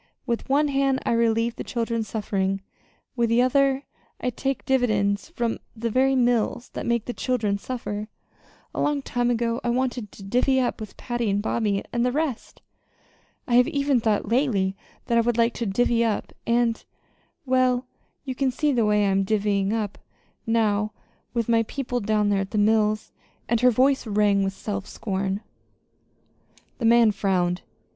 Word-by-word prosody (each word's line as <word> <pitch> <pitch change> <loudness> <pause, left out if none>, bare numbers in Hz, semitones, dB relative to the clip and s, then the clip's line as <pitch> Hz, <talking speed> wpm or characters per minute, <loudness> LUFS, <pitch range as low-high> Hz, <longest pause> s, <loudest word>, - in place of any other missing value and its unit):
With 235 -1 -3
one 290 +2 +3
hand 275 -1 +1
I - - +1
relieve 230 0 +1
the - - -4
children's 230 -2 -2
suffering; 195 -2 -1 0.5
with 235 -2 +1
the 235 +2 +4
other 275 +1 +2 0.4
I 250 - -1
take 270 +3 -3
dividends 215 -6 +1
from 235 -1 -2 0.2
the 230 0 -2
very 265 +3 +3
mills 245 -1 +1
that - - -6
make 235 -2 +1
the 245 - -4
children 215 -7 -1
suffer. 215 -3 -5 0.7
A - - -2
long 290 -2 0
time 245 -2 0
ago 235 0 0
I 240 - 0
wanted 245 -3 -1
to 195 - -12
'divvy 250 +6 +2
up' 250 -1 -1
with 215 - -8
Patty, 240 -3 -2
and 200 +1 +1
Bobby 205 -2 0
and 240 0 +1
the 250 - +2
rest. 290 -3 -3 0.8
I 245 - -1
have 250 - +5
even 280 -2 +1
thought 220 -2 0
lately 225 -7 +1 0.3
that 235 0 +2
I - - +5
would 235 0 0
still 230 - +4
like 230 - -2
to 235 - -3
'divvy 235 +3 +2
up'; 220 -3 -2
and 235 -1 +1 0.6
well, 255 -1 +2 0.4
you 260 - -3
can 265 +1 0
see 295 +4 0
the 235 -5 +2
way 210 -1 +3
I 195 - +2
am 195 0 +2
'divvying 200 -1 +1
up' 215 -3 -2 0.5
now 215 -2 +1 0.4
with 230 -2 0
my 230 -1 +4
people 245 +2 -3
down 210 -1 +1
there 200 -1 +2
at 195 - -4
the 215 - -3
mills!" 215 0 +2 0.4
And 235 0 +1
her 250 - +6
voice 260 +2 +2
rang 205 -1 +3
with 195 0 -1
self 200 0 -5
scorn. 195 -1 -3 1.4
The 235 - -1
man 230 -1 +6
frowned. 180 -3 0
230 Hz, 175 wpm, -24 LUFS, 210-250 Hz, 1.4 s, her